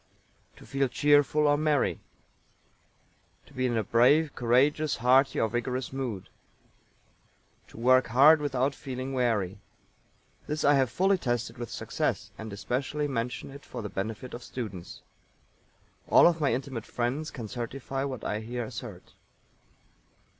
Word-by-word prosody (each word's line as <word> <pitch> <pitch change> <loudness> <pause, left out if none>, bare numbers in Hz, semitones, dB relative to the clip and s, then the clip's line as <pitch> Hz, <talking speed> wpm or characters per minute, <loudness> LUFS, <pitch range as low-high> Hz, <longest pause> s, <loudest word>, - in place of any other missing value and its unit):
To - - -15
feel 135 0 0
cheerful 145 +4 +3
or 145 0 +4
merry. 150 -3 +1 1.5
To - - -20
be 130 -1 0
in 120 -2 -1
a 110 - +1
brave, 135 +8 +3
courageous, 140 +6 +2
hearty 130 +3 +3
or 115 - +2
vigorous 125 +3 -3
mood. 125 -8 -4 1.4
To - - -16
work 130 +2 +4
hard 145 +6 +6
without 135 -1 0
feeling 130 -1 -6
weary. 110 -7 0 0.9
This 150 +1 -2
I 145 - +5
have 135 -3 +3
fully 190 +8 +2
tested 120 -3 -2
with 120 -2 -5
success, - - -3
and 110 -1 -8
especially 135 +8 -2
mention 125 0 -4
it 140 +1 -11
for 120 -3 -7
the 105 - -4
benefit 110 +6 -5
of 120 - -7
students. 105 -8 -7 1.1
All - - +7
of 170 -2 +3
my 145 - +2
intimate 125 -3 -4
friends 130 +6 -2
can 115 -5 -7
certify 130 +4 -4
what 130 -4 -5
I 105 - -2
here 120 +2 -4
assert. - - -9
130 Hz, 140 wpm, -28 LUFS, 115-140 Hz, 1.5 s, All